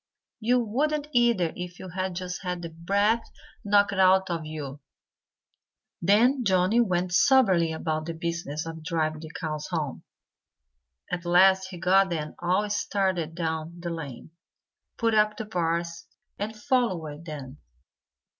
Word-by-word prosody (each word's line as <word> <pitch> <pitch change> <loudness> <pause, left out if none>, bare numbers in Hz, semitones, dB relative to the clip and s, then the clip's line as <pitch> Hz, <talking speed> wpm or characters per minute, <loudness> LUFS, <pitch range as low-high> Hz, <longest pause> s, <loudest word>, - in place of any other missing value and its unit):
You 245 +3 +2
wouldn't, 290 +6 -1
either, 235 - +2
if 180 0 -7
you 185 - -8
had 185 +1 -3
just 180 0 -5
had 180 -2 -4
the 165 - -5
breath 200 +7 +1 0.4
knocked 205 -1 +3
out 190 0 +4
of 165 -2 -3
you." 145 -3 -6 1.2
Then 235 +9 +4
Johnnie 190 +3 +3
went 180 -4 0
soberly 190 -9 +4
about 155 0 -2
the 165 - -4
business 165 -2 -3
of 160 -1 -7
driving 155 -2 -1
the 160 0 -9
cows 155 -2 -4
home. 155 -7 -3 1.1
At 180 -1 -2
last 190 +2 +5
he 185 -1 -9
got 190 +2 +4
them 155 -3 -3
all 185 +4 +1
started 190 -6 -1
down 165 0 -3
the 170 0 -4
lane, 150 -4 -7 0.7
put 230 -1 +1
up 210 0 +3
the 220 - -4
bars, 170 -4 -2 0.3
and 215 +2 -3
followed 185 - -1
them. 145 -3 -8
180 Hz, 140 wpm, -26 LUFS, 165-205 Hz, 1.2 s, last